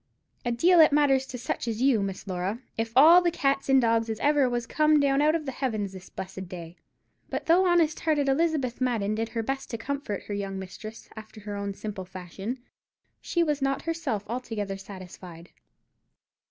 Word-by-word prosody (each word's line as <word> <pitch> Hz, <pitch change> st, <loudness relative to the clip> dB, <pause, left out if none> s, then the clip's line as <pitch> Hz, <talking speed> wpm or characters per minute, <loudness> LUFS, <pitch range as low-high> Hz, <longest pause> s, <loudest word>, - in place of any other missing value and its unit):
A 240 Hz, -, -1 dB
deal 340 Hz, +9 st, +4 dB
it 310 Hz, -2 st, +8 dB
matters 275 Hz, -2 st, +3 dB
to 250 Hz, -, -6 dB
such 240 Hz, 0 st, -3 dB
as 225 Hz, -1 st, -2 dB
you, 255 Hz, -4 st, +3 dB
Miss 195 Hz, -1 st, -4 dB
Laura, 190 Hz, +3 st, -3 dB, 0.2 s
if 225 Hz, 0 st, -2 dB
all 325 Hz, +7 st, +8 dB
the 350 Hz, -, +2 dB
cats 275 Hz, -4 st, 0 dB
and 270 Hz, 0 st, +6 dB
dogs 230 Hz, -1 st, +2 dB
as 220 Hz, -1 st, -3 dB
ever 290 Hz, -3 st, +3 dB
was 240 Hz, -1 st, -2 dB
come 305 Hz, +4 st, +3 dB
down 280 Hz, 0 st, +3 dB
out 305 Hz, +2 st, +4 dB
of 315 Hz, -2 st, -2 dB
the 270 Hz, -, -3 dB
heavens 220 Hz, -7 st, -2 dB
this 190 Hz, 0 st, -11 dB
blessed 190 Hz, -1 st, -7 dB
day." 170 Hz, -2 st, -8 dB, 0.5 s
But -, -, -3 dB
though 360 Hz, +3 st, +4 dB
honest 335 Hz, -3 st, +3 dB
hearted 300 Hz, -3 st, +1 dB
Elizabeth 275 Hz, -4 st, 0 dB
Madden 225 Hz, -5 st, 0 dB
did 225 Hz, +1 st, -2 dB
her 230 Hz, -1 st, -3 dB
best 270 Hz, +3 st, -3 dB
to 230 Hz, -, -4 dB
comfort 265 Hz, -4 st, -4 dB
her 205 Hz, -, -6 dB
young 195 Hz, -1 st, -3 dB
mistress 215 Hz, +4 st, -9 dB
after 220 Hz, 0 st, -11 dB
her 205 Hz, 0 st, -6 dB
own 200 Hz, -1 st, -4 dB
simple 200 Hz, -3 st, -6 dB
fashion, 190 Hz, +6 st, -6 dB, 0.6 s
she 345 Hz, -, +1 dB
was 300 Hz, -3 st, -1 dB
not 275 Hz, 0 st, 0 dB
herself 320 Hz, -11 st, -2 dB
altogether 220 Hz, -4 st, -4 dB
satisfied. 185 Hz, -3 st, -11 dB
235 Hz, 195 wpm, -27 LUFS, 200-285 Hz, 0.6 s, it